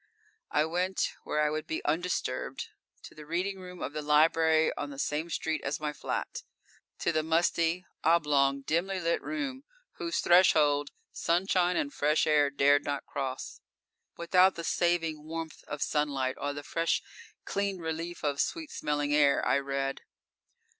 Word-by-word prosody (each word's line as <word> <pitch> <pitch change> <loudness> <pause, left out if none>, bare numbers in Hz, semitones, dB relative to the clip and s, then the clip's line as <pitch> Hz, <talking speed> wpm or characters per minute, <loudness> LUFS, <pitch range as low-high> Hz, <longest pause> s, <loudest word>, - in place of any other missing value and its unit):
I 150 - +2
went 180 +3 -1
where 150 - -1
I 150 0 +2
would 155 0 -3
be 160 - -4
undisturbed, 170 +4 -2 0.3
to - - -11
the 155 - -11
reading 185 +4 -2
room 180 -1 -8
of - - -4
the 150 - -3
library 160 +1 +4
on 145 - -4
the 140 - -9
same 150 +4 -2
street 160 -1 -2
as - - -2
my 150 -1 -3
flat. 140 - -4 0.6
To - - +2
the 155 -1 +1
musty, 165 +2 +1 0.2
oblong, 145 -4 +3
dimly 185 +6 0
lit 170 -1 0
room 280 -4 -4 0.3
whose 340 -3 -2
threshold 150 -5 +4 0.2
sunshine 180 +1 +1
and 285 -1 -1
fresh 150 +2 +2
air 150 -2 +4
dared 140 +1 +3
not 145 -1 -3
cross. 135 -2 -5 0.6
Without 180 +2 +4
the 170 - -5
saving 165 -3 0
warmth 165 0 -6
of 145 -1 -3
sunlight 140 -3 0
or 145 - -2
the 145 0 -7
fresh, 165 +3 0 0.4
clean 200 -1 -1
relief 165 +1 -5
of 145 -1 +1
sweet 320 -2 -3
smelling 145 0 -1
air, 145 -2 +4
I - - +3
read. 135 0 -3
160 Hz, 155 wpm, -29 LUFS, 145-175 Hz, 0.6 s, library